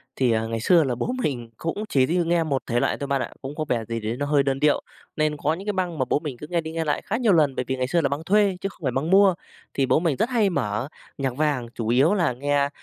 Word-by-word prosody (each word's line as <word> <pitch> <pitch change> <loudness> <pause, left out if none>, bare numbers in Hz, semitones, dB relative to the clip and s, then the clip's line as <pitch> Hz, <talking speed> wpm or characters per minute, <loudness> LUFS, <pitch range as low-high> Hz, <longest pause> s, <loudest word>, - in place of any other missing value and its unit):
Thì, 125 -3 +2
à, 110 0 +1
ngày 115 0 -3
xưa 170 +8 +4
là 130 -4 -1
bố 240 - -2
mình 120 -6 -2
cũng 165 +6 -3
chỉ 130 -2 +3
đi 170 +6 0
nghe 170 0 +2
một 140 -4 -1
thể 120 -1 +1
loại - - 0
thôi 140 - -4
bạn 140 -2 0
ạ, - - -4
cũng 135 +2 -6
có 155 - -2
vẻ 115 -2 0
gì 115 +1 -3
đấy 110 +2 -3
nó 145 - -2
hơi 145 -1 +3
đơn 135 0 -1
điệu. 150 0 +3 0.3
Nên 155 -1 0
có 145 +2 0
những 185 +4 -7
cái 210 - -1
băng 180 -3 -2
mà 130 - +2
bố - - +2
mình 150 -5 -6
cứ 150 - -9
nghe 170 +1 0
đi 160 0 -6
nghe 165 0 -2
lại 150 - 0
khá 220 - -1
nhiều 230 -5 +3
lần 150 -5 +3
bởi 125 - -2
vì 130 - -1
ngày 130 -1 -1
xưa 170 +5 +2
là 140 - +1
băng 140 +3 -3
thuê 200 0 +2
chứ 195 - -2
không - - -19
phải 130 - +1
băng 135 +6 -2
mua. 195 0 +6 0.4
Thì 135 - +1
bố 130 - +3
mình 165 -4 0
rất 230 - +1
hay 225 -6 +2
mở 110 - -2 0.3
nhạc 135 -3 -2
vàng, 145 -5 0
chủ 115 - -3
yếu 130 - +4
là 170 -10 +1
nghe 140 +2 0
145 Hz, 310 wpm, -24 LUFS, 130-170 Hz, 0.4 s, mua